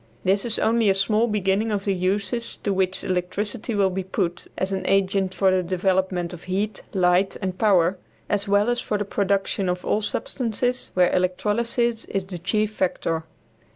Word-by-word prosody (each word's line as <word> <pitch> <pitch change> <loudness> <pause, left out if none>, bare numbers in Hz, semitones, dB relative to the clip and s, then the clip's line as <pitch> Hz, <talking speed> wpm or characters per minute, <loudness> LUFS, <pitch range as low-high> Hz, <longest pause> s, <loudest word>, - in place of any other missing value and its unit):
This 195 +3 +2
is 230 - 0
only 225 -1 +3
a 195 - +4
small 215 +4 +2
beginning 210 +1 +1
of 200 -1 -2
the 200 - +2
uses 200 +5 -1
to 200 - +1
which 190 -1 0
electricity 205 +5 -2
will 195 -2 +3
be 190 +1 -2
put 180 -2 -2
as 190 +1 -1
an 190 - -1
agent 195 -1 +1
for 190 -1 +3
the 185 0 +2
development 185 0 0
of 175 - -10
heat, 195 +2 -2
light 185 0 +2
and 185 -2 -3
power 185 -3 +3 0.3
as 205 -1 0
well 205 +3 +3
as 240 - 0
for 210 - -1
the 205 - -2
production 195 -1 0
of 180 0 -2
all 215 - +1
substances 245 +3 -1
where 180 -1 +4
electrolysis 225 +6 0
is 195 -1 -3
the 185 -2 -6
chief 210 +4 0
factor. 165 -4 -1
195 Hz, 180 wpm, -24 LUFS, 185-210 Hz, 0.3 s, a